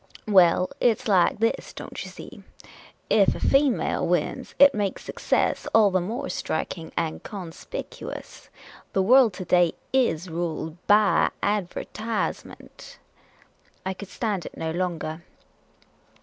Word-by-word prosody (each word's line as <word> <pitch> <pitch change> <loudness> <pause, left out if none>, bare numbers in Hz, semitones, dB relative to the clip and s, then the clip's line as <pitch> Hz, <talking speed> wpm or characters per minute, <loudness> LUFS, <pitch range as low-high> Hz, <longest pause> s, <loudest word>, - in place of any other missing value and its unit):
" - - -29
Well, 185 -3 +4
it 235 -3 +3
's 255 - -8
like 190 -4 +3
this, 225 +1 -1
don't - - -7
you - - -8
see; - - -11 0.7
ef 200 -3 +4
a - - -6
female 275 -2 +2
wins, - - -1
it 280 0 +7
makes 205 -4 -2
success - - -1
all 215 -3 +6
the 185 -1 +2
more 235 +10 -4
striking 165 -2 -4
and 160 -1 -2
con 185 -5 -7
spicuous. - - -8 0.4
The 190 - +2
world 245 0 +6
to 185 - -7
day 175 -1 +3 0.2
is 190 -10 +1
ruled 165 -1 -4
by 210 0 +4
adver/w^ment." 210 +2 -4 0.9
I 190 - -1
could 190 +1 -10
stand 205 -7 -3
it - - -12
no 160 0 -3
longer. 170 -2 -3
195 Hz, 135 wpm, -25 LUFS, 175-225 Hz, 0.9 s, it